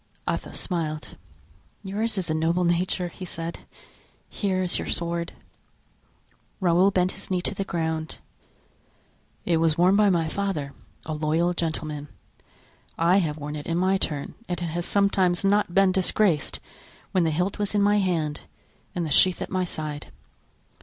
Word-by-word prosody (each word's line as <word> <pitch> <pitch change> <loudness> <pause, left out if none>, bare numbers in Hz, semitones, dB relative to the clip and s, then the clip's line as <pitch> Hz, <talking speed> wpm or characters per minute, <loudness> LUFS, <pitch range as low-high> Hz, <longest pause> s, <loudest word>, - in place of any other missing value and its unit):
Athos - - -2
smiled. 155 -4 -3 0.7
"Yours 215 +3 -1
is 185 - -1
a - - +2
noble 165 +3 +1
nature." 175 +1 +1
he 185 - -10
said; 165 -1 -5 0.7
"here 190 -3 -1
is 180 - 0
your - - -4
sword." 170 0 -1 1.3
Raoul 180 0 +4
bent 185 -1 +1
his - - -10
knee 185 -1 +1
to - - -2
the 195 - -2
ground. 160 -3 -2 1.3
"It 170 - +2
was 160 -1 +2
worn 180 +3 +5
by 210 0 +5
my 170 -3 +2
father, 160 -6 -2 0.3
a 155 - -3
loyal 160 +3 +1
gentleman. 155 -3 -3 0.9
I 170 +3 +4
have 160 -6 0
worn 150 0 -5
it 150 - -6
in 165 - 0
my 190 +2 +2
turn 145 -5 -2 0.2
and 175 - -1
it 175 - -2
has 170 +2 -2
sometimes 195 -2 +2
not 205 -2 +3
been 195 -1 +5
disgraced 185 -3 +2 0.5
when 185 - +3
the 165 - +2
hilt 180 +6 -1
was 205 0 0
in 205 - +4
my 205 +1 +4
hand 165 -6 0 0.5
and 175 -2 -1
the 155 - -4
sheath 185 +5 +5
at - - -5
my 185 -1 +1
side. 155 -3 -5
175 Hz, 160 wpm, -25 LUFS, 160-190 Hz, 1.3 s, worn